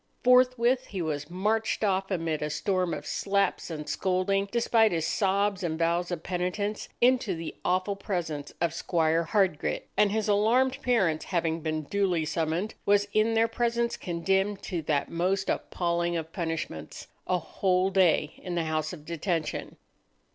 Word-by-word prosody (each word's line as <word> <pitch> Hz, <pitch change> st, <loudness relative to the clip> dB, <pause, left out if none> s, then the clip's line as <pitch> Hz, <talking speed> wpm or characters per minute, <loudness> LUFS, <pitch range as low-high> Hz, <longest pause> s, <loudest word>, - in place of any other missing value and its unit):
Forthwith 250 Hz, 0 st, +4 dB
he 195 Hz, -, -5 dB
was 150 Hz, -1 st, -3 dB
marched 215 Hz, +5 st, 0 dB
off, 195 Hz, -1 st, +1 dB
amid 165 Hz, -5 st, -1 dB
a 150 Hz, -, -1 dB
storm 180 Hz, +4 st, 0 dB
of -, -, -4 dB
slaps 200 Hz, -2 st, 0 dB
and 150 Hz, -2 st, -6 dB
scolding, 190 Hz, +5 st, 0 dB
despite 230 Hz, -2 st, +3 dB
his 165 Hz, -2 st, 0 dB
sobs 200 Hz, 0 st, +1 dB
and 165 Hz, -3 st, -2 dB
vows 170 Hz, +1 st, +1 dB
of 175 Hz, -3 st, -4 dB
penitence, 185 Hz, +4 st, -2 dB
into 245 Hz, -6 st, +3 dB
the 165 Hz, 0 st, -6 dB
awful 185 Hz, +2 st, +1 dB
presence 170 Hz, -7 st, -4 dB
of 170 Hz, -1 st, 0 dB
Squire 165 Hz, -1 st, +1 dB
Hardgrit, 190 Hz, -5 st, +1 dB
and, 210 Hz, -1 st, +4 dB
his 220 Hz, 0 st, 0 dB
alarmed 245 Hz, +6 st, +2 dB
parents 195 Hz, -, +1 dB
having 165 Hz, -2 st, -1 dB
been 155 Hz, 0 st, -2 dB
duly 180 Hz, -1 st, 0 dB
summoned, 165 Hz, +6 st, -1 dB
was 205 Hz, 0 st, +3 dB
in 220 Hz, +1 st, +3 dB
their 225 Hz, +1 st, +4 dB
presence 235 Hz, 0 st, 0 dB
condemned 190 Hz, +3 st, -1 dB
to 175 Hz, -3 st, -3 dB
that 150 Hz, -2 st, -1 dB
most 185 Hz, +3 st, 0 dB
appalling 170 Hz, -1 st, -1 dB
of 160 Hz, 0 st, -6 dB
punishments—a 165 Hz, -, -4 dB
whole 185 Hz, +3 st, 0 dB
day 175 Hz, -5 st, +3 dB
in 180 Hz, -1 st, -4 dB
the 170 Hz, -, +1 dB
house 155 Hz, 0 st, -2 dB
of 150 Hz, -4 st, -10 dB
detention! 170 Hz, 0 st, -3 dB
185 Hz, 155 wpm, -28 LUFS, 165-205 Hz, -, Forthwith